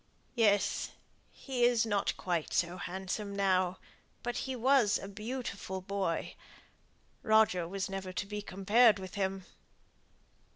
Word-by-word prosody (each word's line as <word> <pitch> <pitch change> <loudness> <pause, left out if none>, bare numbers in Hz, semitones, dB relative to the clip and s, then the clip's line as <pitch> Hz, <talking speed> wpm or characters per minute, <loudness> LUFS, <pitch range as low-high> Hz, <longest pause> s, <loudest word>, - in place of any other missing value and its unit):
"Yes. 210 -4 +2 0.4
He 255 -3 -3
is 240 -2 +4
not 205 -3 0
quite 175 -4 -2
so 175 +1 +1
handsome 190 +3 -4
now; 185 -2 +2 0.5
but 245 0 -2
he 260 - -2
was 250 -3 +4
a - - -7
beautiful 210 -2 -5
boy. 190 -2 -2 0.9
Roger 215 -6 +3
was 190 +1 -3
never 195 -1 -5
to 185 - -3
be 210 +1 -5
compared 205 +4 +4
with 190 -1 -8
him." 190 -1 -2
200 Hz, 125 wpm, -32 LUFS, 190-220 Hz, 0.9 s, is